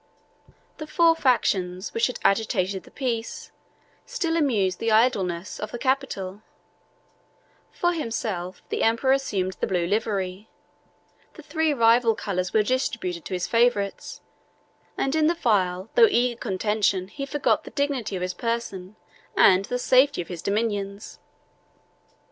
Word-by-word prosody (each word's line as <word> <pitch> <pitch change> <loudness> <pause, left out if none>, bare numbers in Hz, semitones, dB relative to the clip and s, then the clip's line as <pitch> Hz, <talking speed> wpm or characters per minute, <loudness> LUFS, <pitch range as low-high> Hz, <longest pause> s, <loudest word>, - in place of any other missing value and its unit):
The 310 - -6
four 330 +1 +4
factions 190 - 0
which 230 - +2
had 250 - -5
agitated 195 -2 +1
the - - -15
peace, 235 -4 -4 0.5
still 370 -10 -2
amused 215 - +1
the 225 0 0
idleness, 200 -6 +1
of 210 - -4
the - - -6
capital: 240 -7 -2 1.3
for 350 0 0
himself, 220 - -4
the - - -2
emperor 230 +4 +2
assumed 195 -9 -1
the - - -1
blue 180 -3 0
livery; 200 0 -2 0.9
the - - -12
three 320 -1 0
rival 230 -3 +4
colors 185 -4 -3
were 215 - +3
distributed 210 - -2
to 185 - -3
his 180 - -2
favorites, 230 -4 0 0.8
and 270 - 0
in 310 -1 +3
the 340 - +2
vile 190 - 0
though 470 -2 +7
eager 245 - +1
contention 200 -2 0
he 275 +8 -7
forgot 290 +1 +1
the - - -9
dignity 275 -8 -2
of 180 - -3
his 180 0 -2
person 210 -3 -4 0.4
and 190 +1 +5
the 250 - -2
safety 260 +3 +3
of 170 - -5
his 175 -3 -6
dominions. 200 -1 -3
220 Hz, 140 wpm, -25 LUFS, 190-255 Hz, 1.3 s, though